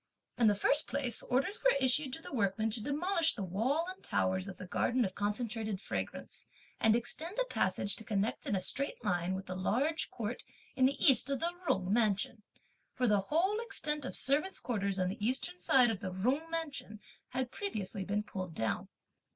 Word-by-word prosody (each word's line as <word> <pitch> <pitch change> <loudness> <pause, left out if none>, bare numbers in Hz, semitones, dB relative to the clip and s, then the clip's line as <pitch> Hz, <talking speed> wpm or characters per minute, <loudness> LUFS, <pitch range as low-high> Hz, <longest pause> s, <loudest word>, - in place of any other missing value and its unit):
In 235 - +4
the 205 - +4
first 285 +9 +4
place, 255 -3 +1
orders 275 - 0
were - - +5
issued 265 +1 +2
to 320 - -5
the - - -9
workmen 220 -1 +1
to 220 +1 +1
demolish 325 - +1
the 205 - -4
wall 235 - 0
and 370 0 -8
towers 185 +1 0
of 195 - -7
the - - -7
garden 240 +6 +1
of 185 - -4
Concentrated 215 0 -2
Fragrance, - - -5 0.4
and 220 0 +5
extend 315 - -3
a - - +2
passage 200 - 0
to - - -7
connect 210 0 -1
in 205 - +1
a 190 - 0
straight 275 +9 -1
line 175 +1 0
with 190 +1 -5
the 185 - -5
large 265 - 0
court 230 +1 -4 0.3
in 260 0 +5
the 275 - -2
East 265 -1 +5
of 275 -2 0
the 340 +1 0
Jung 190 -5 +1
mansion; 215 -1 +1 0.5
for 250 - +1
the 210 -3 +4
whole 380 +8 +2
extent 300 -10 -1
of - - -4
servants' 300 +8 +1
quarters 200 -5 -1
on 185 -1 +1
the 205 +3 -5
Eastern 215 -7 0
side 240 +6 +5
of 210 - -4
the 190 -3 -4
Jung 255 - 0
mansion 295 -10 -4 0.3
had 255 -1 -2
previously 210 - -4
been 205 +2 -1
pulled 185 -5 -6
down. 110 -1 -1
235 Hz, 195 wpm, -33 LUFS, 200-285 Hz, 0.5 s, were